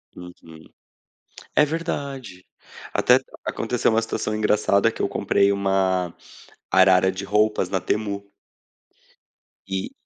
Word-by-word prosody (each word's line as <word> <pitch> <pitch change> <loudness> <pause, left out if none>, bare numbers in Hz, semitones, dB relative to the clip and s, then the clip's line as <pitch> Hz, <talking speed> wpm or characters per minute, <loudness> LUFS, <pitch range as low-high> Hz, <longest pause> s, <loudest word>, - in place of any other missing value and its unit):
Uhum. 85 -3 -13 0.9
É 150 - +5
verdade. 140 - -5 0.5
Até - - +4 0.3
aconteceu 125 -1 0
uma 115 0 +2
situação 110 -1 -3
engraçada 105 -2 +2
que - - -12
eu - - +1
comprei 100 0 +2
uma 95 -3 0 0.6
arara 95 0 +5
de 95 +1 -6
roupas 105 +2 +1
na 95 - 0
Temu. 100 -1 -3 1.4
E 95 0 -3
100 Hz, 105 wpm, -23 LUFS, 95-110 Hz, 1.4 s, É